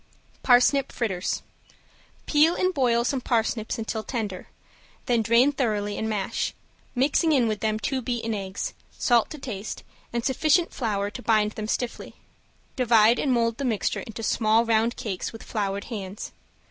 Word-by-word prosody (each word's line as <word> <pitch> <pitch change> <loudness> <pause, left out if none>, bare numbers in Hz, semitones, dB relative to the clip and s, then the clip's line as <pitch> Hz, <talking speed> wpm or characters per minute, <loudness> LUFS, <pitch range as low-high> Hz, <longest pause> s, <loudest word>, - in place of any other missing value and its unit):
~PARSNIP 260 +2 +4
FRITTERS~ 190 -6 -2 0.8
Peel 315 +3 +4
and 370 0 +1
boil 240 -5 +2
some 255 +1 -1
parsnips 225 -2 0
until 220 0 -3
tender, 210 -7 -4 0.6
then 240 -2 +2
drain 235 +5 +4
thoroughly 210 -7 -1
and 220 - -2
mash, 205 -3 -2 0.4
mixing 285 +5 +2
in 250 -5 +3
with 215 -1 -1
them 215 -1 0
two 260 +5 -2
beaten 230 -2 -2
eggs, 195 -2 -4 0.2
salt 240 -3 +3
to 310 - -7
taste, 220 -7 -6 0.3
and 235 -1 -2
sufficient 310 +6 +2
flour 205 -4 -1
to 250 - -8
bind 215 -3 +2
them 215 0 -5
stiffly. 240 +1 -3 0.6
Divide 235 -2 +4
and 275 - +1
mold 230 -2 +1
the - - -2
mixture 230 -6 0
into 225 0 -8
small 220 +1 +3
round 230 +1 +2
cakes 195 -6 -4
with 225 - -10
floured 200 -2 -2
hands. 200 -3 -6
230 Hz, 155 wpm, -25 LUFS, 215-250 Hz, 0.8 s, ~PARSNIP